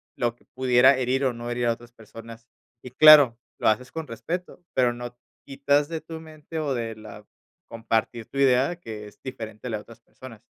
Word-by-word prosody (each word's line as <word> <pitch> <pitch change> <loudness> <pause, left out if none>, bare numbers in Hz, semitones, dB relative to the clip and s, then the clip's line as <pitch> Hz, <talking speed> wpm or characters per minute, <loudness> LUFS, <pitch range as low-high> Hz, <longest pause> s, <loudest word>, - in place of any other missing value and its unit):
lo 120 -1 -1
que - - -29
pudiera 130 +1 +4
herir, 130 +1 0
o 130 - +1
no 120 0 -7
herir 120 0 -1
a 115 - +3
otras 120 +1 -15
personas. 115 0 -13 0.3
Y 125 - -10
claro, 145 -4 +8 0.2
lo - - 0
haces 120 +4 +1
con 160 -1 -6
respeto, 175 +10 -6
pero 125 -2 +2
no 120 0 -8 0.3
quitas 140 +2 +1
de 165 -1 -3
tu 160 +1 -9
mente, 155 0 -8
o 145 -3 -1
de 115 -2 -4
la 110 - -12 0.4
compartir 115 0 -2
tu 140 - -10
idea 135 +4 +3
que 110 -7 -8
es 105 0 -17
diferente 115 -3 -8
a - - -4
la 110 - -1
de - - -11
otras 115 +2 -16
personas. 115 -1 -14
125 Hz, 205 wpm, -25 LUFS, 115-140 Hz, 0.4 s, claro